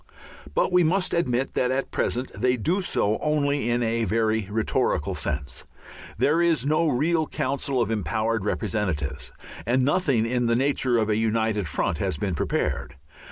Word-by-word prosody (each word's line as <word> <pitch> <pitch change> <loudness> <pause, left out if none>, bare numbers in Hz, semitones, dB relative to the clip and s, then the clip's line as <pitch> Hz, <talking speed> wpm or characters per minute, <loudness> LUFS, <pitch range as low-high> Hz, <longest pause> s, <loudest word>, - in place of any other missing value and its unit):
But - - +2
we 180 -1 +5
must 180 +3 +1
admit 135 -6 0
that 125 - +1
at 135 +1 -1
present 125 +2 -1
they 125 +5 +1
do 170 - 0
so 110 - +1
only 145 -4 0
in 120 0 +1
a 115 0 0
very 110 0 0
rhetorical 105 -8 0
sense. 70 0 -3 0.5
There 160 +4 +3
is 165 -7 +2
no 155 +3 +2
real 155 +4 +1
council 135 0 -2
of 115 -2 0
empowered 110 0 -1
representatives, 85 -10 -2 0.3
and 125 +3 +2
nothing 140 -7 +2
in 120 0 0
the 115 - +2
nature 130 -1 +1
of 110 -2 +1
a 105 - +2
united 110 -3 0
front 70 - -1
has - - -1
been 95 +4 -2
prepared. 75 -1 -2
120 Hz, 160 wpm, -25 LUFS, 110-140 Hz, 0.5 s, we